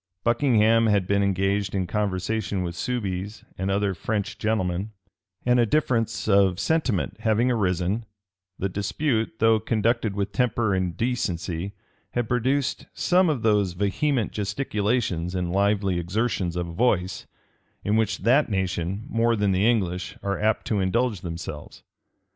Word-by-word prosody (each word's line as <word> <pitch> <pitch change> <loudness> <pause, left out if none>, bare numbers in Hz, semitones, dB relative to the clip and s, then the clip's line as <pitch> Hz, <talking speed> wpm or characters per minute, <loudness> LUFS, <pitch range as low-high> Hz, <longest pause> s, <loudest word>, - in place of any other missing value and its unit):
Buckingham 115 -2 +3
had 100 -3 +2
been 100 +2 +2
engaged 100 0 0
in 95 -2 0
conversation 100 0 -1
with 85 -1 -3
Soubize 100 -1 -3
and 95 +1 -2
other 100 0 +1
French 100 +3 -3
gentlemen; 105 -2 -1 0.5
and 125 0 +4
a 120 - +5
difference 115 -5 0
of 100 -3 +4
sentiment 115 - 0
having 115 +3 +2
arisen, 100 0 0 0.5
the 95 - -1
dispute, 110 +4 -1
though 110 0 +4
conducted 110 -1 0
with 100 0 -2
temper 110 0 +1
and 95 -2 -1
decency, 95 -6 -2 0.4
had 120 -2 -1
produced 130 +3 0
some 180 0 +3
of 140 -7 -1
those 105 -4 +2
vehement 105 +7 0
gesticulations 105 -4 -1
and 90 -1 -1
lively 100 -1 +1
exertions 95 -1 -1
of 90 -1 -1
voice, 90 0 0 0.6
in 105 - +1
which 110 -3 0
that 130 +6 +4
nation, 95 0 -2
more 115 +1 +2
than 105 -2 +1
the 95 +4 +3
English, 90 -6 -1
are 100 0 -1
apt 110 +1 +1
to 105 - 0
indulge 105 +1 0
themselves. 85 -3 -7
105 Hz, 140 wpm, -25 LUFS, 95-115 Hz, 0.6 s, a